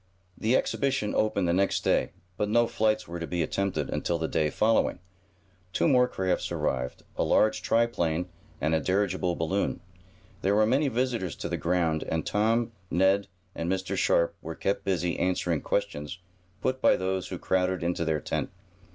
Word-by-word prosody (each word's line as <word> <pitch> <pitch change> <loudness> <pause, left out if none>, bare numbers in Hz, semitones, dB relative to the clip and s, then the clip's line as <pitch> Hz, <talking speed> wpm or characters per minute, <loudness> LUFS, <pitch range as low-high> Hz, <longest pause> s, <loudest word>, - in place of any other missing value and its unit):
The 115 +4 +1
exhibition 135 -6 0
opened 100 -4 +1
the 85 - +2
next 95 +2 +1
day, - - +2 0.3
but 105 +1 -1
no 120 +2 +4
flights 110 -2 0
were 85 0 -5
to 85 - -4
be 85 -2 -1
attempted 100 +5 -1
until 85 - -1
the 80 -1 -2
day 75 -1 +1
following. 110 +8 +2 0.8
Two - - +2
more 125 -4 +5
crafts 95 -6 -1
arrived, 65 -1 -2
a - - +2
large 110 0 +3
triplane, 90 -8 +1 0.3
and 80 +3 0
a 80 - +3
dirigible 95 -1 0
balloon. 90 +5 -1 0.6
There 100 +2 +2
were 110 +1 +5
many 135 +6 +2
visitors 120 - -1
to - - -5
the - - -1
ground, 85 -3 +1
and 80 0 -1
Tom, 115 +3 +1 0.2
Ned 95 +3 +3 0.3
and 85 0 -2
Mr. 95 0 -2
Sharp 85 0 +2
were 80 +1 -6
kept 100 +4 -1
busy 90 -3 -1
answering 90 -3 0
questions 75 +4 -2 0.5
put 130 0 0
by - - +5
those 95 -1 -2
who - - -5
crowded 95 -1 0
into 85 0 0
their 80 -2 0
tent. - - -2
95 Hz, 170 wpm, -28 LUFS, 85-110 Hz, 0.8 s, more